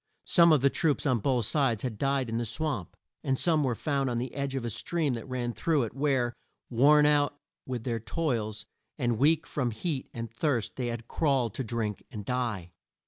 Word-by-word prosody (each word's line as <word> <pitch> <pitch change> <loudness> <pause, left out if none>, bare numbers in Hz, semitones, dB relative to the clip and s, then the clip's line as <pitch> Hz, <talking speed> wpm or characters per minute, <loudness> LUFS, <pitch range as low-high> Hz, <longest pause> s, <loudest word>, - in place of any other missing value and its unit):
Some 170 -2 +6
of 150 -4 +5
the 140 0 +4
troops 155 -4 +1
on 130 -4 +2
both 125 0 +1
sides 120 -5 +1
had 115 -5 -3
died 135 -2 +1
in 115 0 -2
the - - -1
swamp, 120 - -2 0.3
and 135 -1 +1
some 160 -1 +3
were 125 -4 0
found 140 +1 0
on 120 - -1
the 125 +1 -3
edge 140 0 -2
of 130 -3 -2
a 120 - -2
stream 145 +7 -1
that 115 +1 -6
ran 120 -2 -2
through 155 -1 +1
it, 115 - -4
where, 135 -3 +1 0.4
worn 145 +5 +6
out 145 -1 +3 0.3
with 125 -3 -3
their 115 -2 -1
toils, 115 -3 -2 0.3
and 120 -5 0
weak 155 +3 +3
from 130 -5 -1
heat 135 +4 -3
and 115 -1 -6
thirst 120 -2 -1
they 125 -2 -2
had 115 -1 -5
crawled 135 -8 +1
to 135 - -3
drink 110 -3 -3
and 105 -2 -7
die. 115 -9 -2
125 Hz, 205 wpm, -29 LUFS, 115-145 Hz, 0.4 s, Some